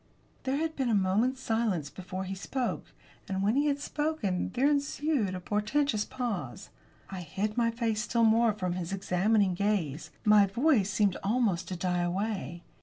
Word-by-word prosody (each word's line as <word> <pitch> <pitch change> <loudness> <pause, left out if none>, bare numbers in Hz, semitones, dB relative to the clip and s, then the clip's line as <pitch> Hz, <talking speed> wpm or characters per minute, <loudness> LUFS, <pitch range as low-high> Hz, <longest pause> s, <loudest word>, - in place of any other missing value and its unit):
There 265 +1 +1
had 320 +1 -2
been 265 -3 0
a 225 - +3
moment's 215 +7 +1
silence 215 - -1
before 185 0 -6
he 190 0 -4
spoke. 195 - -3 0.4
And, 190 0 -1
when 210 +4 +2
he 290 +2 +3
had 285 -1 +1
spoken, 290 - -1
there 260 +3 +3
ensued 285 -7 0
a - - -4
portentous 210 +4 0
pause. 195 - -4 0.4
I 190 -2 -5
hid 200 +6 -3
my 235 -1 +2
face 230 -2 -1
still 230 +2 +1
more 225 +1 +4
from 185 -4 -2
his 175 -1 -4
examining 195 +1 +2
gaze. 180 -6 -1 0.2
My 210 -1 +6
voice 235 -1 +2
seemed 195 -1 +1
almost 200 -5 +1
to 185 - -4
die 180 0 0
away. 175 -3 -2
210 Hz, 170 wpm, -29 LUFS, 185-240 Hz, 0.4 s, My